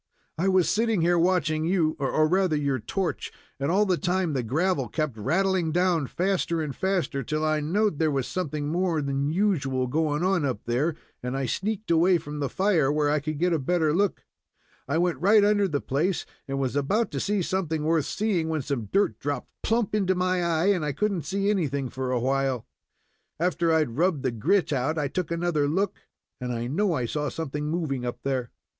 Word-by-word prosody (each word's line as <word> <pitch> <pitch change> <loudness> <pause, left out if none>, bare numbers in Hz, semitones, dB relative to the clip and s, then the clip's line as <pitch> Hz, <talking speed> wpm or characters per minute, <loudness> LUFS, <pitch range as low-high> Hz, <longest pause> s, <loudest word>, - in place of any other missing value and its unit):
"I 175 +5 0
was 185 -2 +3
sitting 225 -3 +1
here 175 +1 +3
watching 165 -3 +2
you, 165 -2 +1
or 150 +3 +2
rather 185 -1 +2
your 140 -3 0
torch, 180 - -3 0.3
and 140 +2 -1
all 200 +5 +3
the 185 -3 +1
time 180 -3 0
the 130 - 0
gravel 140 +3 0
kept 155 -6 -2
rattling 170 - +1
down 175 -4 +2
faster 180 -1 0
and 150 -4 -3
faster, 185 -7 -1
till 155 +4 -2
I 155 0 +2
knowed 175 +3 0
there 160 -1 +3
was 135 -3 -1
something 150 -5 -3
more 175 0 0
than 140 +1 -1
usual 155 -9 +1
going 150 +3 0
on 185 -3 +2
up 130 -3 -2
there, 140 +7 0 0.3
and 125 +2 -3
I 135 - -1
sneaked 205 - -2
away 175 +2 +5
from 150 -2 -7
the 140 -2 -1
fire, 175 -5 +2
where 150 -1 +1
I 150 - +2
could 155 +1 -4
get 175 +3 +1
a 160 - +1
better 155 +2 +1
look. 200 +3 0 0.6
I 140 +4 0
went 175 0 +1
right 205 +4 +5
under 205 -1 +3
the 150 -5 -1
place, 165 +7 -1 0.2
and 135 0 -3
was 135 -1 -1
about 200 +12 +1
to - - -3
see 200 -2 0
something 165 -4 -1
worth 160 -2 +2
seeing, 195 -7 0
when 155 -3 -1
some 130 -5 -2
dirt 200 - +1
dropped 145 0 -4
plump 225 -2 0
into 190 -3 +2
my 185 0 +1
eye, 170 +2 +2
and 180 -5 -2
I 150 -1 -1
couldn't 195 +1 -1
see 195 +1 -1
anything 140 -9 -1
for 130 0 -4
a 125 - +1
while. 135 -1 0 0.7
After 170 -1 +1
I 160 - +4
had 135 -6 -1
rubbed 170 -5 +2
the 130 - +1
grit 150 - +1
out 140 +5 0
I 150 -2 0
took 180 +3 -3
another 170 -3 0
look, 190 +6 -1 0.4
and 125 -1 -3
I 120 0 -2
know 180 +9 +1
I 130 -6 -1
saw 150 +4 -2
something 150 -1 -4
moving 155 -6 -2
up 120 0 -4
there." 130 -3 -1
160 Hz, 205 wpm, -26 LUFS, 140-185 Hz, 0.7 s, away